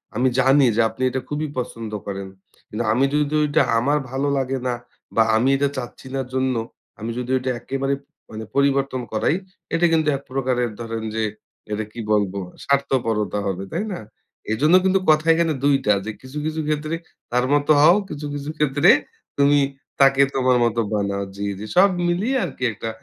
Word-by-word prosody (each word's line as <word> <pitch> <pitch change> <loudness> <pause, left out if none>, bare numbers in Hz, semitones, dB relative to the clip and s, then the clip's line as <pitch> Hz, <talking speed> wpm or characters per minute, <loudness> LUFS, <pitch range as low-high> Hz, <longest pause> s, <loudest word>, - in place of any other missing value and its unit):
আমি 125 +4 +2
জানি 135 +1 +5
যে 120 - +4
আপনি 110 +3 -11
এটা 130 +1 -3
খুবই 150 +1 -2
পছন্দ 115 -3 -5 0.2
করেন। 100 -1 -4 0.4
কিন্তু 110 +3 -3
আমি 130 +4 +3
যদি 150 0 +1
ওইটা 145 -1 +2 0.2
আমার 145 +5 +2
ভালো 135 +2 -1
লাগে 135 0 -1
না, 125 - 0 0.4
বা 115 - +6
আমি 120 +4 +3
এটা 140 0 +1
চাচ্ছিনা 130 +2 -5
জন্য 130 -1 +1 0.4
আমি 110 +2 -4
যদি 125 0 -4
ঐটা 130 0 -2
একেবারে 135 +2 -2 0.4
মানে 110 0 -7
পরিবর্তন 140 -2 +1
করাই, 110 +8 +1 0.4
এটা 165 +1 +3
কিন্তু 160 -1 +2
এক - - -13
প্রকারের 125 -3 0
ধরেন 115 -1 -4
যে 110 - 0 0.5
এটা 105 +1 -1
কি 120 - -10
বলবো? 100 -2 +1 0.3
স্বার্থপরতা 115 -8 0
হবে, 95 0 -3
তাই 185 +6 -1
না? - - -6 0.5
এজন্য 150 +10 +4
কিন্তু 190 0 +3
কথা 155 0 +4
এখানে 165 -1 +1
দুইটা 135 -7 +3
যে 110 - -3
কিছু, 130 +3 -9
কিছু 155 0 -2
ক্ষেত্রে 155 +1 -1 0.4
তার 125 +1 +2
মত 145 0 +2
হও, 170 +4 +7
কিছু, 150 0 -6
কিছু 145 0 -5
ক্ষেত্রে 150 +2 +3 0.5
তুমি 145 +1 +5 0.4
তাকে 135 0 +6
তোমার 130 -1 +3
মতো 115 0 +1
বানাও 100 -1 -1
জি, 100 +1 -4
জি। 105 - -6
সব 190 +3 +7 0.2
মিলিয়ে 195 +10 0
আরকি 135 -5 -7
একটা 110 +1 -5
135 Hz, 175 wpm, -22 LUFS, 115-145 Hz, 0.5 s, হও